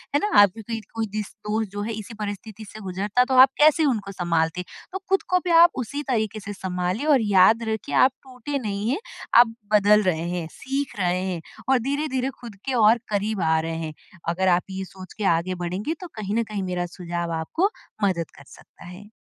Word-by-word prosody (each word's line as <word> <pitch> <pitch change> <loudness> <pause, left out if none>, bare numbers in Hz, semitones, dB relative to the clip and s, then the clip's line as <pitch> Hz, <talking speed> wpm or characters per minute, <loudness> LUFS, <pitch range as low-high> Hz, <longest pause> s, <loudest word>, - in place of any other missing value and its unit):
है - - +5
ना? 415 - 0
आपकी 205 +2 +3
कोई 225 +1 -5
को 225 - -2
दीस 210 -1 -4 0.2
दोस्त 215 -1 -1
जो 205 0 -4
है 225 +2 -3
इसी 215 +1 -7
परिस्थिति 210 +1 -6
से 215 - -9
गुजरता 200 +5 0
तो 260 - 0
आप 260 +1 +9
कैसे 310 +1 +5
उनको 215 -8 -1
सँभालते? 170 -1 0 0.3
तो 385 - -4
खुद 385 0 +2
को 365 - +4
भी 355 - 0
आप 345 - +8 0.2
उसी 285 +6 -5
तरीके 220 -2 -1
से 205 +1 -6
सँभालिए 185 +5 -2
और 260 - +2
याद 205 +2 +5
रखिए 220 -2 -3
आप 260 - +3
टूटे 260 +2 -5
नहीं 210 -2 -2
हैं 285 +9 0 0.4
आप 230 -1 +7 0.2
बदल 210 +1 +5
रहे 165 +1 -3
हैं 175 -2 -3
सीख 270 -1 -4
रहे 180 0 +1
हैं। 170 -2 -4 0.3
और 265 -1 +5
धीरे-धीरे 270 0 -1
खुद 235 -4 -9
के 270 - -1
और 220 +3 +6
करीब 210 -1 -1
आ 160 -1 +3
रहे 165 0 -3
हैं। 155 - -6 0.4
अगर 185 +3 0
आप 175 0 +3
ये 190 0 -4
सोच 185 0 -12
के 215 - -6
आगे 180 +3 -2
बढ़ेंगी 180 - -3
तो 365 - -6
कहीं 210 -1 -3
न 230 - +2
कहीं 210 -3 -4
मेरा 180 -1 -2
सुझाव 170 -1 -3
आपको 240 - 0 0.3
मदद 175 -5 0
कर - - -13
सकता - - -16
है। 180 +4 -11
210 Hz, 210 wpm, -24 LUFS, 180-240 Hz, 0.4 s, आप